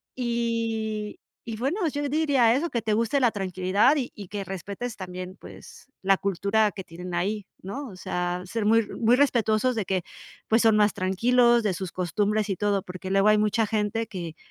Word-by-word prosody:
Y 230 -3 -2 0.3
y 225 - -3
bueno, 275 - -1
yo 290 -1 -2
diría 280 -6 +3
eso, 320 +5 -1
que 235 - -2
te 220 - -2
guste 230 +5 +1
la 240 -3 +4
tranquilidad 195 - +2
y 260 -4 -2
y 200 -3 -9
que 200 +1 -4
respetes 200 +6 -6
también, 185 0 -7
pues, - - -13
la 195 0 +3
cultura 200 +3 +1
que 190 -2 -7
tienen 180 +2 -8
ahí, 200 +3 -1 0.2
¿no? 265 +9 -6
O 190 - -11
sea, 180 0 -3
ser 220 +3 -3
muy 225 +2 +5
r 210 - -8
muy 235 +1 +4
respetuosos 250 -3 +2
de 215 -4 -1
que, 185 -2 -1 0.5
pues, 225 +1 +4
son 225 -1 +5
más 210 0 +4
tranquilos 235 +5 +3
de 205 -3 +1
sus 185 0 -5
costumbres 205 +4 0
y 190 - -1
todo, 205 -2 0
porque, 185 +1 -7
luego 195 +2 +4
hay 215 - +5
mucha 215 +1 +2
gente 215 +1 -1
que 170 -4 -6
210 Hz, 195 wpm, -26 LUFS, 190-230 Hz, 0.5 s, muy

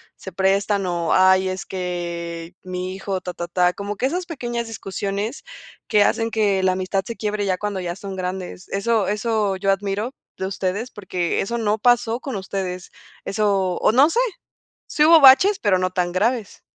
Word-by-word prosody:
se 190 - -9
prestan, 195 +2 +1
o, 170 -2 0
"Ay, 190 0 +5
es 185 +1 -5
que 170 -2 -5
mi 185 0 -4
hijo", 195 -1 -3
ta, 180 - -6
ta, 175 0 -5
ta. 180 0 +2
Como 200 +1 -5
que 225 - -1
esas 355 +5 -2
pequeñas 240 -8 -4
discusiones 200 +2 -4 0.4
que 210 -3 +4
hacen 225 +2 +1
que 205 -4 +2
la 185 - +4
amistad 190 +1 -1
se 235 - -5
quiebre 210 -1 -2
ya 185 -2 0
cuando 205 -1 -3
ya 175 -1 -4
son 195 -1 -7
grandes. 185 0 -5
Eso 205 +1 +1
eso 210 -1 0
yo 195 +1 +1
admiro 200 +5 -2 0.2
de 190 - -3
ustedes, 195 +5 -3
porque, 180 -4 -2
eso 235 +4 -2
no 215 -1 +1
pasó 240 0 +2
con 260 -4 -5
ustedes. 190 -1 -4 0.3
Eso, 195 -3 +1
o, - - +3
no 270 +7 +5
sé, 460 - 0 0.7
sí 300 - +2
hubo 330 +1 +8
baches, 280 +10 +7
pero 205 -3 +2
no 185 0 0
tan 175 -1 -1
graves. 220 +3 -1
195 Hz, 185 wpm, -22 LUFS, 185-220 Hz, 0.7 s, hubo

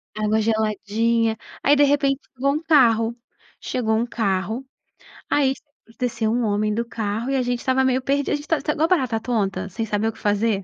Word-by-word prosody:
Água 215 +1 +1
geladinha. 220 +1 0 0.3
Aí, 285 - +5
de 290 - +5
repente, 280 -1 +2
chegou 275 +2 0
um 305 - -2
carro 235 -7 +4 0.4
chegou 220 -3 -1
um 230 +2 +1
carro. 220 +2 -2 0.6
Ai, 270 -2 +3
sa - - -20 0.4
desceu 225 -3 -1
um 240 0 0
homem 210 0 0
do 235 +2 -1
carro 225 +1 -3
e - - +1
a 260 - +2
gente 245 -1 -1
estava 260 +1 +1
meio 260 0 +2
perdidos, 280 +2 0
a - - +3
gente 290 - -6
estava 310 -1 0
estava 300 +2 -2
igual 320 +2 +3
barata 255 -11 +1
tonta, 195 -5 -1
sem 225 +5 -3
saber 215 +1 -1
o 225 - -2
que 225 - -17
fazer. 205 -1 +1
230 Hz, 205 wpm, -22 LUFS, 215-265 Hz, 0.6 s, Aí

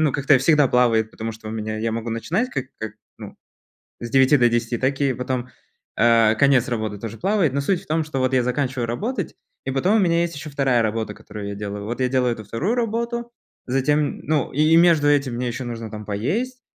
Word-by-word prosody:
ну, 155 -3 +2
как-то 140 -1 +3
всегда 150 +2 +4
плавает, 115 -3 +2
потому 115 +1 -5
что 110 0 -10
у - - -5
меня 110 -1 -4
я 110 0 -1
могу 115 +1 -4
начинать 170 - -1
как, 135 -2 -3
как 110 0 -5 0.3
ну, - - -10 0.6
с 120 - -6
9 135 +2 +5
до 120 -1 +4
10, 120 0 -1
так 135 +3 -1
и 135 -2 +2
потом, 125 0 -3 0.5
а, 115 -2 +4
конец 130 0 +3
работы 110 -4 -3
тоже 115 0 -7
плавает, 190 -7 +1
но 140 - 0
суть 175 +5 0
в - - -23
том, 160 +1 0
что 150 -3 -4
вот 130 0 0
я 125 -2 +3
заканчиваю 125 -1 -1
работать, 220 - -3 0.3
и 135 - -2
потом 180 +11 +2
у - - +3
меня 170 -3 +2
есть 170 -1 -2
ещё 150 +2 -7
вторая 135 -4 +1
работа, 110 -1 -2
которую 105 -1 -8
я 100 - -5
делаю. 100 0 -5
Вот 120 +4 -4
я 130 - +2
делаю 125 -2 +1
эту 110 -1 -9
вторую 155 - -1
работу, 235 0 -2 0.4
затем 145 +3 +1
ну, 150 -4 0
и 155 +3 +4
между 165 -3 +5
этим 140 -4 +2
мне 125 +1 -2
ещё 125 +2 -4
нужно 115 -2 -6
там 105 0 -7
поесть, 210 - -2
130 Hz, 220 wpm, -22 LUFS, 115-150 Hz, 0.6 s, 9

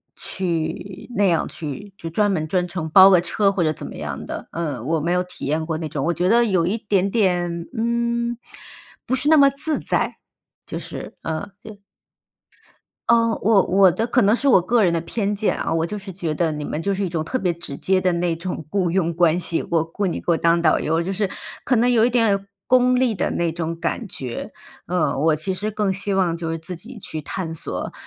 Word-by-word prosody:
去 185 +4 -4
那 205 - +3
样 170 -4 +2
去 170 +6 -7
就 165 - -6
专 205 +5 +1
门 155 -5 -1
专 180 +2 0
程 170 -3 -5
包 190 +4 +8
个 180 -2 +5
车 195 +3 +1
或 195 - -2
者 155 - +2
怎 - - -7
么 - - -8
样 75 -2 -5
的， - - -6
嗯， 150 -8 -4
我 165 0 +1
没 170 +3 -1
有 180 0 +1
体 180 - -7
验 155 +3 0
过 160 -2 -2
那 160 -1 -4
种。 145 -2 -3
我 170 - +2
觉 175 +2 0
得 235 +2 +5
有 185 -6 +1
一 195 +6 0
点 200 -2 0
点， 175 -5 0
嗯， 235 +1 -1 0.7
不 260 - 0
是 260 +3 +1
那 315 - +6
么 280 -1 +6
自 300 +3 +5
在， - - 0 0.5
就 - - -5
是 - - -8
呃， 160 +5 -4
对。 215 -2 -11 1.3
哦， 230 -1 +3
我 210 -2 +4
我 190 0 +5
的 220 - -1
可 245 +1 +3
能 205 +1 +4
是 275 +4 +1
我 235 - +6
个 220 +6 +2
人 180 -4 +3
的 170 - 0
偏 200 +4 -2
见 205 +1 0
啊， - - -2
我 165 0 +1
就 210 - -5
是 195 -1 -8
觉 170 -4 -3
得 165 +1 0
你 150 -1 -4
们 155 - -4
就 200 - 0
是 195 +1 -1
一 - - -1
种 165 -2 -2
特 210 +11 -2
别 180 -7 0
直 165 -4 -7
接 190 +4 +1
的 185 -1 +1
那 170 0 0
种 170 -1 -6
雇 185 0 0
佣 170 -2 0
关 170 0 +3
系， 170 -2 +2
我 165 -2 +2
雇 180 +5 -3
你 170 - -3
给 - - -11
我 - - +3
当 170 +1 +2
导 160 -2 +3
游， 160 +2 0
就 190 - -2
是 195 0 -1 0.3
可 255 - +2
能 235 +2 +3
有 225 -2 +4
一 245 - +3
点 210 -5 +2 0.2
功 250 0 +4
利 250 -3 +2
的 185 - -1
那 170 -1 -1
种 165 0 -4
感 215 +5 -3
觉。 125 -8 -6 0.3
呃， 180 -1 0
我 155 0 +3
其 185 +5 -2
实 205 +4 -3
更 210 -2 0
希 195 +1 -2
望 180 -3 +1
就 165 -1 -4
是 165 - -3
自 170 +3 -6
己 220 +8 -9
去 155 -6 -6
探 165 +2 -4
索， 160 - -4
185 Hz, 250 characters per minute, -22 LUFS, 165-210 Hz, 1.3 s, 包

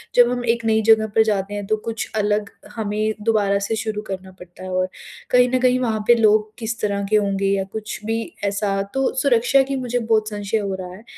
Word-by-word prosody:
जब 245 0 +6
हम 245 0 -2
एक 235 -1 -6
नई 220 0 +3
जगह 220 0 +6
पर 220 - +6
जाते 205 -2 -1
हैं, 205 -1 -4
तो 215 - +1
कुछ 225 0 -4
अलग 210 -1 0 0.3
हमें 215 0 -1
दोबारा 210 -3 +2
से 225 - -1
शुरू 215 -1 -3
करना 190 0 -6
पड़ता 180 +1 -13
है 185 - -6
और 185 0 0 0.4
कहीं 250 0 +5
न - - +3
कहीं, 255 0 +3
वहाँ 225 -4 -1
पे 240 - +7
लोग 215 -1 +3
किस 230 0 -4
तरह 200 -1 -1
के - - +4
होंगे 195 -1 +1
या 195 - -1
कुछ 215 -1 -5
भी 225 +1 -1 0.2
ऐसा, 200 -1 0
तो 270 0 0
सुरक्षा 260 0 +4
की 275 +1 -3
मुझे 245 -1 -1
बहुत 220 -2 +1
संशय 205 +1 -2
हो 200 -2 -3
रहा 180 -1 -7
है। 215 - -14
215 Hz, 225 wpm, -21 LUFS, 200-230 Hz, 0.4 s, पे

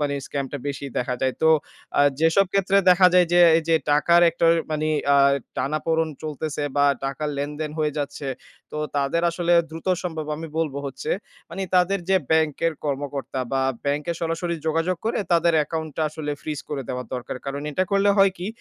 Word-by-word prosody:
মানে 145 -1 0
scam 140 -1 -3
টা 145 - -3
বেশি 140 0 -5
দেখা 125 0 -1
যায়। 130 -1 0
তো 160 - +5 0.5
আ - - +6 0.2
যেসব 165 +5 +4
ক্ষেত্রে 195 0 +2
দেখা 180 +1 +6
যায় 180 -1 +6
যে, 175 - +6 0.2
এই 165 - +1
যে 165 - +4 0.2
টাকার 170 +4 +4
একটা 165 0 0
ওই - - +2 0.2
মানে 155 0 -1 0.3
আ - - +5 0.4
টানাপোড়েন 160 +4 0
চলতেছে 155 0 -4
বা 145 - +4 0.2
টাকার 140 +3 -3
লেনদেন 150 +2 -3
হয়ে 150 -1 0
যাচ্ছে, 145 -1 -4 0.4
তো - - -5 0.2
তাদের 140 +4 0
আসলে 170 0 0 0.2
দ্রুত 160 +2 -9 0.2
সম্ভব 160 -4 -4
আমি 165 +2 -6
বলব 155 -4 -1
হচ্ছে 290 - -5 0.4
মানে 195 - -4
তাদের 180 +2 +3
যে 190 - +4
ব্যাংকের 160 +1 +2
কর্মকর্তা 140 -2 -3
বা 135 0 +1 0.2
ব্যাংকে 145 +4 -1
সরাসরি 170 +1 -2
যোগাযোগ 165 +3 0
করে, 225 - 0
তাদের 170 0 +4
অ্যাকাউন্ট 160 +1 -2
টা - - 0
আসলে 155 -1 -5
freeze 150 -2 -5
করে 140 -2 -3
দেওয়া 125 0 -3
দরকার। 125 0 -5
কারণ 140 +1 -4
এটা 185 +6 0
করলে 200 +1 +4
হয় 195 -1 +6
কি, 180 - -4
155 Hz, 185 wpm, -23 LUFS, 145-170 Hz, 0.5 s, আ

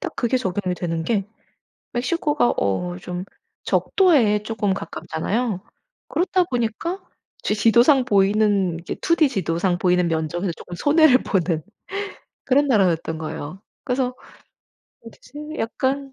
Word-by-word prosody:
딱 355 -4 -5
그게 245 +1 +1
적용이 190 -5 -1
되는 165 -2 -3
게 200 +2 0 0.7
멕시코가 290 +1 +1
어 90 -3 -1
좀 180 - -5 0.4
적도에 270 - +3
쪼금 210 -3 -1
가깝잖아요. 205 +3 -3 0.5
그렇다 365 +1 +1
보니까 250 - -2 0.4
제 - - +1
지도상 240 +5 +4
보이는 200 -4 +2
이게 170 - -5
2 335 - +3
D 305 -5 +4
지도상 180 -4 0
보이는 180 0 +2
면적에서 170 +3 -1
조금 175 - -10
손해를 290 - +5
보는 175 -5 0 0.8
그런 280 +2 +3
나라였던 175 -8 +2
거예요. 155 +2 -6 0.2
그래서 250 -1 -1 0.9
어디지 305 -9 -10
약간 270 +4 -2
210 Hz, 280 characters per minute, -22 LUFS, 180-265 Hz, 0.9 s, 손해를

